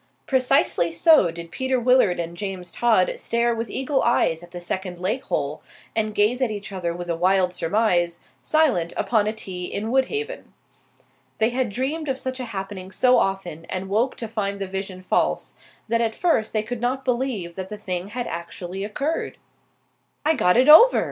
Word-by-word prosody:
Precisely 260 - +2
so 205 - +5
did 170 0 -8
Peter 260 -1 0
Willard 240 -7 +3
and 170 0 -4
James 185 -2 -5
Todd 220 -5 +2
stare 235 0 +1
with 230 -1 -4
eagle 270 +3 0
eyes 165 -8 +2
at 175 - -13
the 175 0 -8
second 180 +1 -4
lake 205 +9 -2
hole, 145 +1 -2 0.3
and 215 -1 -1
gaze 220 +5 +2
at 255 - +2
each 205 -1 -6
other 180 -3 -2
with 175 +1 -6
a 170 - -1
wild 180 +1 +2
surmise, 175 -2 +1 0.2
silent 260 - +2
upon 215 -3 +1
a - - +1
tee 185 -5 -6
in 215 +5 -3
Woodhaven. 430 - -1 0.8
They 220 +1 +2
had 250 -1 -1
dreamed 275 +8 -3
of 265 - -1
such 260 0 -4
a 250 - -3
happening 195 -3 -6
so 250 +6 +4
often 185 -5 -2
and 185 +2 -5
woke 230 +6 +1
to 230 - -6
find 200 -2 -3
the 195 - -2
vision 190 -1 -6
false, - - 0 0.3
that 230 +1 +1
at 225 -1 0
first 325 -11 +1
they 215 -1 0
could 235 +1 -5
not 260 +2 -1
believe 240 -9 -1
that 190 0 -6
the 210 - -6
thing 185 -3 -4
had 240 +3 -4
actually 175 +3 -6
occurred. 275 +10 -3 0.9
"I 315 - +4
got 215 - +3
over!" 325 +12 +9
210 Hz, 180 wpm, -23 LUFS, 180-250 Hz, 0.9 s, over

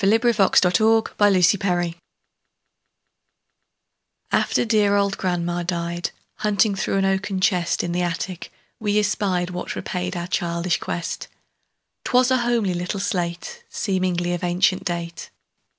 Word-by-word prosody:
Eugene 210 +3 +4
Field 195 -3 +4
Little 220 +5 +4 0.2
Homer's 195 -4 +5
Slate 175 -4 0 2.4
AFTER - - +2
dear 210 -3 +3
old 200 0 +1
grandma 175 -1 -1
died, 170 0 -2 0.3
Hunting 210 0 +2
through 195 0 -1
an 195 - +2
oaken 195 0 0
chest 180 -2 +1
In 175 - -2
the 175 +1 0
attic, 175 +1 -4 0.3
we 210 -1 0
espied 195 -4 0
What 180 0 -5
repaid 180 0 -3
our 170 - -3
childish 175 -1 -1
quest; 170 -1 -4 0.8
'Twas 250 +1 +3
a 260 - +4
homely 235 -6 +1
little 180 +3 -3
slate, 185 - -3
Seemingly 180 -3 -1
of 175 - -4
ancient 185 +2 +1
date. 170 -1 -4
185 Hz, 130 wpm, -22 LUFS, 175-205 Hz, 2.4 s, Homer's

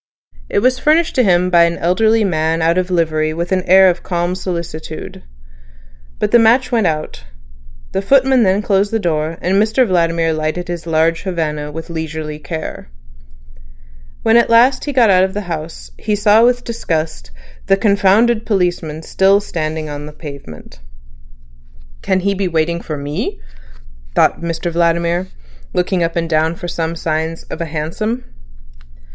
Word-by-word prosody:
It 200 - 0
was 255 0 +2
furnished 320 +4 +2
to 255 - +3
him 180 -2 +2
by 170 -1 +6
an 170 0 -1
elderly 220 +6 +2
man 160 -3 0
out 170 +2 +2
of 185 0 -2
livery 155 -3 0
with 170 +2 -4
an 185 -1 +2
air 190 +1 +7
of 175 -1 +1
calm 175 0 -2
solicitude. 170 -4 -6 1.0
But - - -1
the 240 - +6
match 235 +4 +3
went 225 -6 +2
out; 155 - -4 0.7
the 195 - -1
footman 265 +3 +3
then 195 0 +2
closed 200 0 +1
the 225 - 0
door, 165 -4 -2
and 190 +3 +2
Mr 225 +4 +2
Vladimir 165 -4 +1
lighted 155 +3 -3
his 170 -1 -5
large 165 +1 +1
Havana 150 -5 -3
with 160 +2 -8
leisurely 160 -2 -5
care. 155 - -7 1.3
When 225 +1 +4
at 235 - +3
last 245 +3 +4
he 290 - -2
got 240 -6 +4
out 185 0 +5
of 190 +1 -2
the 205 - -2
house, 165 -3 -7
he 210 -1 -1
saw 210 +2 +4
with 245 0 +2
disgust 160 - -3 0.4
the 195 0 +4
"confounded 210 +3 +3
policeman" 175 -7 -1
still 195 +4 +3
standing 155 -5 -4
on 145 0 -6
the 150 - -10
pavement. 140 - -11 1.2
"Can 190 0 0
he 200 +2 0
be 195 -1 -1
waiting 170 0 -1
for 155 - -5
me," 145 - -4 0.8
thought - - +2
Mr 170 0 -3
Vladimir, 170 +1 0 0.5
looking 180 0 0
up 165 0 -1
and 165 -1 -1
down 160 +1 +1
for 175 - -7
some 165 -1 -3
signs 160 0 -3
of - - -5
a - - -1
hansom. 165 +10 -3
175 Hz, 165 wpm, -17 LUFS, 160-200 Hz, 1.3 s, air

